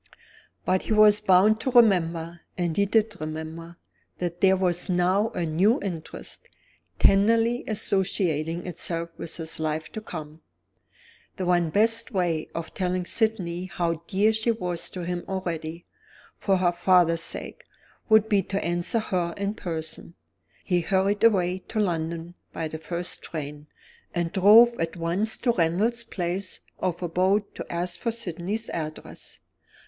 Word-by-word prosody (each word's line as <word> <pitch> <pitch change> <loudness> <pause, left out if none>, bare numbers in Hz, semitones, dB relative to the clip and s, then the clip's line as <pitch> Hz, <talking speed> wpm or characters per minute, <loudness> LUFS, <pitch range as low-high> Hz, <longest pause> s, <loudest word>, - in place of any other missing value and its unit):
But 185 0 +2
he - - -2
was 210 -1 +6
bound 210 +2 +4
to 260 - -1
remember 175 -8 +3 0.2
and 175 -3 -1
he 200 0 +2
did 215 -2 +1
remember 160 +2 -6 0.4
that 175 -1 -4
there 190 -1 +5
was 180 0 0
now 185 +4 +2
a 170 - -3
new 185 +9 +2
interest, 170 -5 -7 0.5
tenderly 230 +4 +3
associating 180 -6 0
itself 170 -1 -2
with 165 - -4
his 160 -1 -2
life 155 0 -2
to 220 - -6
come. 160 -6 -8 0.9
The 185 - -3
one 175 -2 +2
best 225 +6 +2
way 175 -7 -1
of 165 -1 -5
telling 180 -1 -1
Sydney 185 -5 0
how 170 -3 -2
dear 210 +3 +2
she 220 +2 0
was 180 -7 0
to 180 -2 -6
him 175 0 -3
already, 170 -3 -4 0.5
for 195 -2 +1
her 180 -1 +2
father's 175 -2 +3
sake, - - -4 0.5
would 220 0 +5
be 205 -3 +3
to 195 +1 -3
answer 175 +6 0
her 180 -6 -1
in 200 +1 -2
person. 165 -3 -6 0.5
He 180 -2 +1
hurried 195 +4 +1
away 185 -5 +3
to 220 - -3
London 170 -3 -2 0.2
by 160 -1 -4
the 160 - -6
first 175 +2 -2
train, 150 -1 -7 0.5
and 170 -1 -1
drove 225 +6 +6
at 165 +2 -2
once 175 +6 0
to 245 - +1
Randal's 210 +6 +1
place 185 -3 -3 0.2
of 180 -1 -2
abode 190 +4 +1
to - - -8
ask 175 0 -2
for 230 - -1
Sydney's 210 0 -4
address. 155 -2 -7
180 Hz, 145 wpm, -25 LUFS, 170-205 Hz, 0.9 s, was